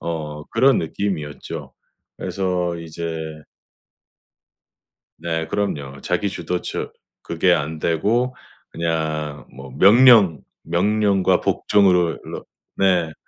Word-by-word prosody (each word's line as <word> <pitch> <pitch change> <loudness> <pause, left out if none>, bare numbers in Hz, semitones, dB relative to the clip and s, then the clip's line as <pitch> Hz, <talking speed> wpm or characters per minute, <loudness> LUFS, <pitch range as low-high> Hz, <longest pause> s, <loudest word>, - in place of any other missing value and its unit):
어 75 -3 -5
그런 130 +2 +4
느낌이었죠. 80 -3 -4 0.4
그래서 90 -2 -2
이제 85 0 -6 2.1
네, 80 -1 -2
그럼요. 70 -9 -3
자기 - - -1
주도적 90 -1 -4 0.3
그게 - - +1
안 75 +2 -1
되고 110 +11 0 0.4
그냥 80 -3 -3
뭐 65 0 -10
명령, 105 - +6 0.2
명령과 100 +3 +2
복종으로 90 -5 +2
로 - - -8 0.3
네. 90 -4 +2
85 Hz, 185 characters per minute, -21 LUFS, 80-100 Hz, 2.1 s, 명령